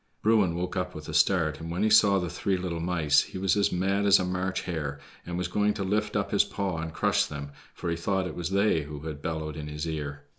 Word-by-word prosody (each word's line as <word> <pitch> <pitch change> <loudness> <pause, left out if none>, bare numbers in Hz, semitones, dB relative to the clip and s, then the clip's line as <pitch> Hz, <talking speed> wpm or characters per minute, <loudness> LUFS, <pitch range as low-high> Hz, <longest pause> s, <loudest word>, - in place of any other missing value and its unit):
Bruin 105 -6 +3
woke 90 +2 -3
up 90 -1 -2
with 75 0 -8
a - - -6
start, 80 -6 +2
and 80 0 -7
when 90 +4 -1
he 110 - +3
saw 100 -2 +6
the 90 -2 -1
three 95 +2 -1
little 90 -2 -3
mice, 80 -4 +3
he - - -7
was 95 +1 +2
as 100 -1 +2
mad 100 +3 +1
as 100 0 +7
a 95 - -1
March 90 +1 -2
hare, 75 -5 -4 0.3
and 85 0 -3
was 90 - -1
going 105 0 +1
to 100 - -2
lift 105 +2 -1
up 100 -1 -1
his 100 - +5
paw 95 -5 -3
and 80 0 -4
crush - - +2
them, 70 -1 -7 0.2
for - - -6
he 85 - 0
thought 95 +3 -1
it 90 - -5
was 85 -1 -3
they 100 -3 +2
who 75 0 -8
had 75 -2 -6
bellowed 80 -2 -3
in 75 -1 -6
his 75 +2 -4
ear. 70 -2 -4
90 Hz, 260 wpm, -27 LUFS, 80-100 Hz, 0.3 s, as